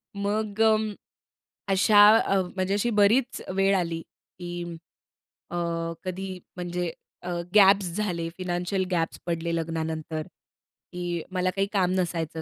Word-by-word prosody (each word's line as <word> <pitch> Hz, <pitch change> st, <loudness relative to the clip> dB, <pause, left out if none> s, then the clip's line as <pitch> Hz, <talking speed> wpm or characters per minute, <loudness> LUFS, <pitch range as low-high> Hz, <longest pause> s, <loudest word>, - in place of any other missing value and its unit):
मग 205 Hz, +1 st, -1 dB
अ, 220 Hz, 0 st, +6 dB, 1.0 s
अशा 205 Hz, +2 st, +7 dB
अ, 195 Hz, -3 st, +2 dB
म्हणजे 185 Hz, +1 st, 0 dB
अशी 210 Hz, +4 st, +1 dB
बरीच 240 Hz, +5 st, +3 dB
वेळ 195 Hz, 0 st, +3 dB
आली, 165 Hz, -2 st, -2 dB, 0.4 s
की 175 Hz, -1 st, -5 dB, 0.9 s
अ, 175 Hz, -, -3 dB, 0.5 s
कधी 190 Hz, +1 st, -4 dB, 0.3 s
म्हणजे 175 Hz, -1 st, -3 dB, 0.3 s
अ, 180 Hz, -, -6 dB, 0.3 s
गॅप्स 195 Hz, -3 st, +6 dB
झाले, 175 Hz, -6 st, -1 dB
फायनान्शियल 180 Hz, +2 st, -2 dB
गॅप्स 165 Hz, -2 st, -1 dB
पडले 170 Hz, -1 st, -1 dB
लग्नानंतर, 160 Hz, -1 st, -3 dB, 0.7 s
की 175 Hz, -1 st, -3 dB
मला 185 Hz, 0 st, 0 dB
काही 195 Hz, 0 st, +1 dB
काम 185 Hz, -2 st, +2 dB
नसायचं 165 Hz, -2 st, -2 dB
180 Hz, 120 wpm, -26 LUFS, 170-195 Hz, 1.0 s, अशा